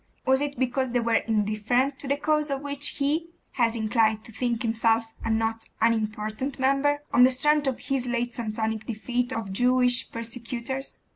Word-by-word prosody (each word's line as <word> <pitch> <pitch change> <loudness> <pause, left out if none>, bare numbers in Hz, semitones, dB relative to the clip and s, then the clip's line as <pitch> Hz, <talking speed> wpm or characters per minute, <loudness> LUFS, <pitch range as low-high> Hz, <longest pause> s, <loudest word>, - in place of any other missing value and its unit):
Was 265 +1 +3
it 285 -2 -2
because 260 0 0
they 245 - +3
were 230 -1 +2
indifferent 220 +5 +1
to 280 - -7
the 280 +1 +1
cause 300 0 +1
of 275 -1 -2
which 285 0 -2
he 300 +4 0 0.3
was 230 -1 +3
inclined 220 -1 +1
to - - -12
think 240 +1 -1
himself 225 0 +1
a 225 - -2
not 225 0 0
unimportant 220 +3 -1
member, 275 +2 +2
on 245 - +5
the 250 - +8
strength 290 +3 +2
of 260 - -1
his 265 -2 -2
late 240 0 -1
Samsonic 220 -1 -3
defeat 245 +2 -2
of 225 -6 -4
Jewish 245 +2 +3
persecutors? 235 +3 -5
245 Hz, 170 wpm, -26 LUFS, 225-270 Hz, 0.3 s, the